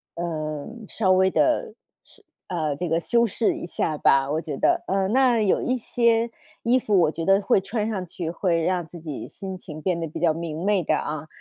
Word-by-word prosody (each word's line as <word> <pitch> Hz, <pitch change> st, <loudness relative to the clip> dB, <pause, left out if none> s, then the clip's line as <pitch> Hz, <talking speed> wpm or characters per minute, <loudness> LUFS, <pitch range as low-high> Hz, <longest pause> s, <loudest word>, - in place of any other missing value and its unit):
呃， 155 Hz, -3 st, -4 dB, 0.2 s
稍 190 Hz, -2 st, +1 dB
微 190 Hz, 0 st, +4 dB
地， 300 Hz, -4 st, +1 dB, 0.3 s
是 -, -, -20 dB, 0.2 s
呃， 155 Hz, -5 st, -1 dB
这 175 Hz, +4 st, -3 dB
个 165 Hz, -, +2 dB
修 235 Hz, +7 st, +2 dB
饰 225 Hz, +1 st, 0 dB
一 -, -, -6 dB
下 160 Hz, -2 st, -2 dB
吧， 135 Hz, -1 st, +3 dB
我 155 Hz, -, 0 dB
觉 150 Hz, -4 st, -5 dB
得。 -, -, +2 dB
嗯， 195 Hz, 0 st, 0 dB
那 255 Hz, -3 st, +4 dB
有 205 Hz, -, +2 dB
一 255 Hz, -, 0 dB
些 235 Hz, -1 st, +1 dB, 0.3 s
衣 245 Hz, +2 st, +3 dB
服 210 Hz, -5 st, +2 dB
我 155 Hz, -, +3 dB
觉 165 Hz, 0 st, -4 dB
得 195 Hz, +2 st, +5 dB
会 195 Hz, -, +3 dB
穿 215 Hz, +2 st, -2 dB
上 195 Hz, -4 st, -3 dB
去， 170 Hz, -1 st, -5 dB
会 170 Hz, 0 st, 0 dB
让 180 Hz, +1 st, 0 dB
自 170 Hz, -, -11 dB
己 155 Hz, -4 st, -6 dB
心 190 Hz, -1 st, -7 dB
情 155 Hz, -4 st, -9 dB
变 180 Hz, -1 st, 0 dB
得 165 Hz, -, -3 dB
比 155 Hz, -, -7 dB
较 165 Hz, -2 st, +3 dB
明 165 Hz, 0 st, -5 dB
媚 200 Hz, -3 st, +2 dB
的 -, -, +1 dB
啊。 155 Hz, 0 st, -4 dB
180 Hz, 230 characters per minute, -24 LUFS, 160-210 Hz, 0.3 s, 得